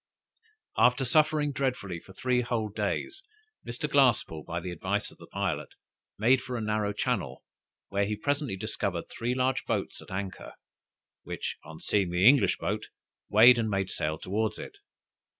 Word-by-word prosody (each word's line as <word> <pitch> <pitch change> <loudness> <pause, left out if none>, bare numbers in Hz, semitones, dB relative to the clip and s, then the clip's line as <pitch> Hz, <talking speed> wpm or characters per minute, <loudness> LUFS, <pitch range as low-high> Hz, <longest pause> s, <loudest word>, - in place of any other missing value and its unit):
After 125 +2 +4
suffering 150 +2 +3
dreadfully 125 -10 -2
for 90 - -16
three 125 +5 +1
whole 115 -3 -1
days, 105 - -3 0.5
Mr. 120 +5 -3
Glasspoole, 125 - +3
by 85 +1 -4
the 90 +1 -5
advice 85 - -2
of - - -19
the - - -12
pilot, - - -3 0.4
made 125 +4 +4
for 125 -1 -4
a - - -2
narrow 105 -1 0
channel, 105 - -2 0.5
where 100 0 +1
he 105 - -1
presently 145 -3 -1
discovered 100 -4 -2
three 120 +2 -2
large 130 0 +1
boats - - -2
at - - -14
anchor, 95 0 -5 0.7
which, - - -5
on 80 +1 -11
seeing 100 -4 +1
the 90 +4 +4
English 140 +1 +5
boat, - - -3 0.4
weighed 120 +4 +8
and 110 -1 0
made 95 -2 -1
sail 75 +1 -1
towards 110 +6 -2
it. 405 - -9
110 Hz, 160 wpm, -29 LUFS, 95-130 Hz, 0.7 s, weighed